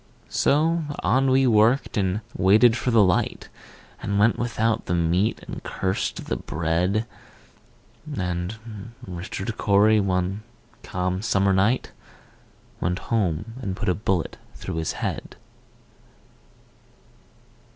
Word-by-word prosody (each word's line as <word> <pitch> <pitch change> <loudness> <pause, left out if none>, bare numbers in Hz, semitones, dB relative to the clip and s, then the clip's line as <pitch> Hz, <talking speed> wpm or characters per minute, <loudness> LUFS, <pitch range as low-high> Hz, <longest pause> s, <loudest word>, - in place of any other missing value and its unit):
So 160 +3 +2 0.2
on 135 +1 +3
we 130 +1 +4
worked, 115 +4 +3
and 100 0 0
waited 110 +5 +5
for 125 - -1
the 115 -3 +5
light, 90 -2 0 0.5
And 100 0 -1
went 105 +3 +3
without 115 -1 0
the 90 - +1
meat, 85 +5 +1
and - - -6
cursed 95 0 -2
the - - -2
bread; 85 +7 0 1.1
And 100 +5 -4
Richard 95 +4 -5
Cory, 105 +1 +4
one 95 +1 0 0.4
calm 90 +1 -2
summer 100 -2 +2
night, 105 +7 +1 0.9
Went 90 +1 0 0.2
home 105 0 0
and 95 -6 -3
put 95 - -2
a - - +3
bullet 95 -3 -1 0.2
through - - -5
his 80 -1 -1
head. - - -4
100 Hz, 115 wpm, -24 LUFS, 90-115 Hz, 1.1 s, waited